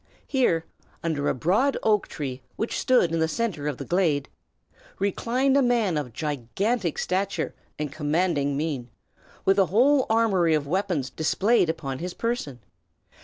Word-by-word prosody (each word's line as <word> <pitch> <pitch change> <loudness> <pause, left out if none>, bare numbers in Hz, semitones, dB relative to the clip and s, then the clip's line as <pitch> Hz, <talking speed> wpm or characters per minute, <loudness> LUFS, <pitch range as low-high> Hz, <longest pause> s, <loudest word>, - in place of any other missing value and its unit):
Here, 175 - +1 0.4
under 155 -4 0
a - - 0
broad 205 - +2
oak 210 -2 +2
tree 130 -3 -5
which 225 - -2
stood 245 -10 +3
in 165 - 0
the 160 - +2
centre 175 -6 -2
of 145 -4 -2
the - - -6
glade, 165 -6 +1 0.7
reclined 245 +7 +1
a 280 - +5
man 235 -8 +2
of 145 -5 -3
gigantic 155 - -2
stature 195 +2 -1 0.2
and 150 -2 -3
commanding 150 -2 0
mien, 140 -5 -3 0.6
with 195 +1 +4
a 190 - +4
whole 260 +6 +4
armory 195 -8 +3
of 150 -2 -1
weapons 175 -4 -1
displayed 190 +4 +2
upon 135 -5 -3
his 180 +1 -5
person. 230 - -3
175 Hz, 150 wpm, -25 LUFS, 150-220 Hz, 0.7 s, a